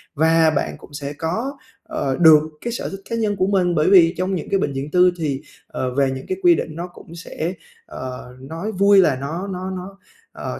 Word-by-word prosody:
và 160 +1 +4
bạn 150 -2 -1
cũng - - -16
sẽ 145 0 -5
có, 220 - -3 0.3
ờ, 135 -1 -2
được 160 -3 +7 0.2
cái 235 - -3
sở - - -4
thích 195 0 -8
cá 230 - -1
nhân 215 -3 0
của 185 - +1
mình 185 -3 +1
bởi 155 +1 +3
vì 175 -4 +6
trong 185 +2 -1
những 160 - -5
cái 195 - +2
bệnh 145 -6 -1
viện 135 +2 -5
tư 180 +1 +5
thì, 145 -5 -2 0.3
ờ, 130 -1 -3
về 135 -1 +2
những 130 0 -6
cái 375 - -2
quy 350 -1 +7
định 155 - -4
nó 170 +2 -5
cũng 170 -1 -14
sẽ, 170 0 -4 0.3
ờ, 125 -1 -8
nói 165 +10 -5
vui 200 0 +4
là 155 -7 +4
nó 155 +9 -5
nó 185 -1 -5
nó, 190 +1 -7 0.3
ờ, - - -6
170 Hz, 225 wpm, -21 LUFS, 145-195 Hz, 0.3 s, được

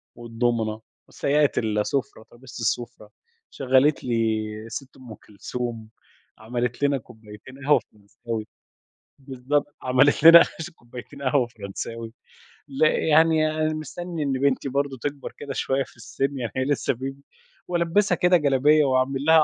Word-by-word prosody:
والدومينو، 115 -2 -2 0.3
وسيّقت 145 0 +1
السُفرة، 110 +2 -1
ترابيزة 125 +1 -12
السُفرة، 115 -1 -3 0.4
شغّلت 135 +2 +2
لي 115 -3 0 0.2
الست 130 +4 -8
أم 125 -4 -11
كلثوم، 115 +1 -6 0.5
عملت 120 +4 -3
لنا 140 -1 +3
كوبايتين 110 +2 -14
قهوة 150 - +5
فرنساوي 105 +2 -8 0.7
بالضبط، 140 +2 -2
عملت 130 +3 +3
لنا 165 +1 +10 0.3
كوبايتين 125 +3 -12
قهوة 130 -2 +2
فرنساوي 115 +1 -7 0.5
لأ 145 +2 +2
يعني 160 0 +3
أنا 155 0 0
مستني 160 +2 -5
إن 140 - -1
بنتي 135 +1 0
برضه 140 0 -1
تكبر 145 -1 -5
كده 140 -1 -6
شوية 135 0 0
في - - -18
السن 135 +3 -3
يعني 120 -4 -4
هي 130 - 0
لسه 145 -1 0
baby 135 +3 -5 0.5
وألبِّسها 175 +3 +1
كده 180 +1 +4
جلابية 150 +1 +3
وأعمل 130 +1 0
لها 160 -1 +7
130 Hz, 130 wpm, -24 LUFS, 115-145 Hz, 0.7 s, لنا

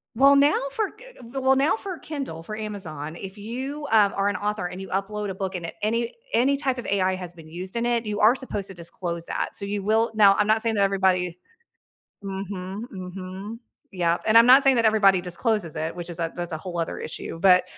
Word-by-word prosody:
Well, 275 +4 +6
now 285 +2 +4
for 425 +5 -1
g - - -14
g 245 - -7
well, 265 0 +4
now 280 +9 +2
for 385 -5 -5
Kindle, 275 - -6
for 215 +4 -6
Amazon, 165 -8 -6
if 195 +3 -8
you, 265 +7 -5
um, 210 -3 +5
are 195 - +2
an 205 - 0
author 210 -2 -2
and 180 +2 -8
you 190 - -8
upload 205 +2 -2
a - - -3
book 190 -1 -4
and 170 - -4
it - - -8
any 230 +2 0 0.2
any 275 +4 +3
type 270 -3 -1
of 245 - -6
AI 190 -1 +1
has 180 -2 -7
been 165 -2 -14
used 180 +6 -6
in 235 - 0
it, 235 -1 0
you 210 0 -3
are 220 +4 +6
supposed 210 -7 -4
to 195 - -6
disclose 170 0 -3
that. - - -3
So - - 0
you 200 0 -2
will 220 +2 +2
now 205 -2 +6
I'm 210 - +2
not 220 +1 +3
saying 225 -1 0
that 200 - +1
everybody 185 -3 +1 0.9
Mhm, 195 0 -5
mhm. 190 +3 -7 0.3
Yep, 170 -2 0
and 220 +1 +4
I'm 230 - +7
not 260 +2 +8
saying 270 -2 +5
that 230 - +2
everybody 200 -4 +5
discloses 180 -1 -1
it, 160 +1 -3
which 175 -1 -6
is 170 - -2
that 165 -1 -3
that's 175 -1 -4
a 160 - -3
whole 175 +1 -6
other 165 - -2
issue. - - -6
But, 180 +1 +5
200 Hz, 235 wpm, -25 LUFS, 180-230 Hz, 0.9 s, not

